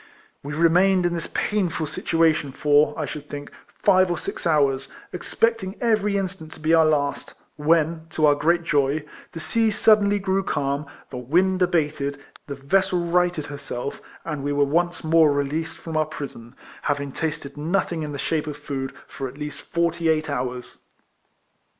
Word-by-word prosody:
We 145 +1 -6
remained 180 +3 +4
in 175 - +1
this 170 -2 -4
painful 180 -6 0
situation 155 -1 +1
for, 145 +2 +3
I 155 - -1
should 150 +1 -7
think, 145 0 -7 0.3
five 185 -1 +5
or 175 - 0
six - - -4
hours, 140 -4 +2 0.3
expecting 195 +1 0
every 210 -4 +2
instant 185 -5 -4
to - - -13
be 155 +1 +1
our 160 -1 +6
last, 145 -2 -1 0.2
when, 160 +1 +1
to 155 - +1
our 145 - +6
great 170 +4 +2
joy, 145 -1 +1 0.3
the 165 - -6
sea 225 +7 +1
suddenly 205 -1 +4
grew 195 -1 0
calm, 140 -4 -2 0.2
the 125 - -5
wind 185 +9 +2
abated, 150 -5 0 0.3
the 140 - -5
vessel 180 +5 +1
righted 175 -2 +1
herself, 140 -2 -5 0.2
and 150 -4 -4
we 145 - -1
were 145 0 +3
once 175 +5 0
more 160 -1 +5
released 145 +3 -2
from 165 -1 -7
our 155 -1 +2
prison, 135 -6 -8 0.3
having 140 -1 -1
tasted 150 -2 -4
nothing 165 +2 -1
in 150 -1 -4
the 140 - -5
shape 155 +2 -1
of 150 -1 -5
food 135 -2 -5
for 135 - -5
at 130 +2 -11
least 150 0 -6
forty 170 -1 0
eight 155 -1 +1
hours. 125 -2 -4
155 Hz, 170 wpm, -23 LUFS, 145-175 Hz, 0.3 s, our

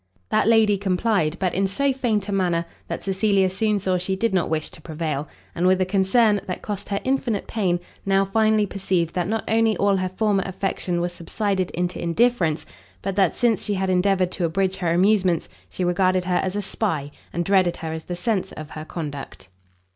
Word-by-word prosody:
That - - +2
lady 220 -3 +5
complied, 185 -4 +1
but 185 -1 -1
in 195 +1 +1
so 275 +8 +1
faint 225 -6 0
a - - -3
manner, 175 -4 +1 0.2
that - - -5
Cecilia 195 -1 +2
soon 210 +2 +1
saw 185 -2 0
she 190 +2 -1
did 225 +2 0
not 180 -3 +1
wish 155 -1 -1
to - - -14
prevail; 155 -3 -3 0.3
and 175 +2 +1
with 185 0 +4
a 185 - +2
concern, 200 +3 +3
that 180 - -4
cost 205 -2 -5
her 200 0 0
infinite 255 -5 0
pain, 185 -6 0 0.2
now 195 0 +2
finally 215 +1 +2
perceived 185 -4 -1
that 180 -2 -1
not 220 +2 -1
only 225 0 +2
all 200 -1 +3
her 185 0 -1
former 200 +1 +1
affection 185 -2 -2
was 175 0 -2
subsided 190 +2 -2
into 180 +1 -3
indifference, 170 -3 +1 0.4
but 195 -1 -2
that, 195 -4 +3
since 235 -5 +2
she 205 - -1
had 190 0 0
endeavoured 185 0 +2
to 180 -1 -1
abridge 190 +3 0
her 175 -3 0
amusements, 185 -1 +3 0.2
she 185 - -4
regarded 185 +1 +2
her 180 -1 +1
as 190 0 -2
a 205 - -1
spy, 160 -8 -2 0.2
and 175 0 -2
dreaded 185 -2 +3
her 160 -1 -5
as 160 -1 -6
the 175 - -4
censor 190 -1 -1
of 155 0 -8
her 155 0 -7
conduct. 145 - -7
190 Hz, 200 wpm, -23 LUFS, 175-205 Hz, 0.4 s, lady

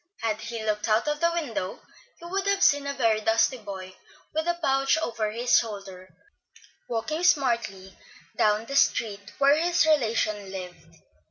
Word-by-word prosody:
Had 220 -1 -1
he 230 0 -5
looked 210 +1 -1
out 215 +6 +2
of 295 0 -1
the 335 +1 +2
window, 260 - -3 0.4
he 340 - -13
would 385 +3 -2
have 400 0 +2
seen 285 -1 +4
a 280 - -2
very 225 -5 +2
dusty 225 +4 +2
boy, 190 -3 -8 0.4
with 315 +2 -1
a 345 - +1
pouch 270 -2 +2
over 230 -8 -2
his 240 +3 +3
shoulder, 195 -4 -7 0.8
walking 305 +8 -2
smartly 235 - +1 0.4
down 210 +1 +2
the 275 - -6
street 205 -6 +1
where 280 +1 +5
his 345 +1 +2
relation 220 -9 +1
lived. 180 -2 -9
230 Hz, 160 wpm, -26 LUFS, 210-295 Hz, 0.8 s, where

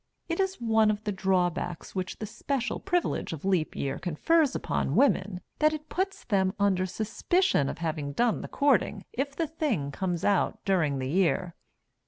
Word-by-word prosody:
It 335 +1 -2
is 385 0 +1
one 220 -2 +3
of 210 0 -1
the 210 - -1
drawbacks 180 -3 -1
which 185 -1 -3
the 215 - -4
special 245 +4 -2
privilege 355 - -1
of 160 +2 -7
Leap 185 -5 +1
Year 135 -1 -2
confers 280 - +2
upon - - -1
women 195 -9 +2 0.2
that 305 0 +4
it 310 0 -6
puts 385 +1 -2
them 190 -3 +1
under 190 -2 +2
suspicion 220 - +1
of - - -5
having 155 -4 -3
done 235 +6 +1
the - - -6
courting 230 -7 +1
if 280 +2 -2
the 330 - 0
thing 280 - -2
comes 175 0 -2
out 200 -3 +2
during 165 -8 +2
the 130 -1 -2
year." 180 0 +1
200 Hz, 175 wpm, -28 LUFS, 175-280 Hz, 0.2 s, that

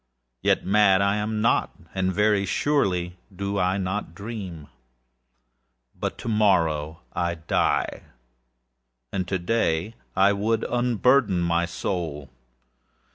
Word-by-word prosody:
Yet, - - +2
mad 100 -1 +5
am 105 +2 0
I - - +6 0.2
notâand 95 +3 -3
very 105 0 +3
surely 90 -9 0 0.2
do 100 +1 -2
I 90 +1 +1
not 95 -2 -3
dream. 95 -7 -7 1.3
But - - -4
to - - -8
morrow 80 -8 +1
I 85 0 -1
die, 80 0 0 1.1
and 95 -2 -2
to 95 - 0
day 90 -1 0 0.2
I 100 +1 +5
would 110 +3 0
unburthen 120 -4 +2
my 85 0 +1
soul. 85 -5 -4
95 Hz, 110 wpm, -25 LUFS, 85-105 Hz, 1.3 s, I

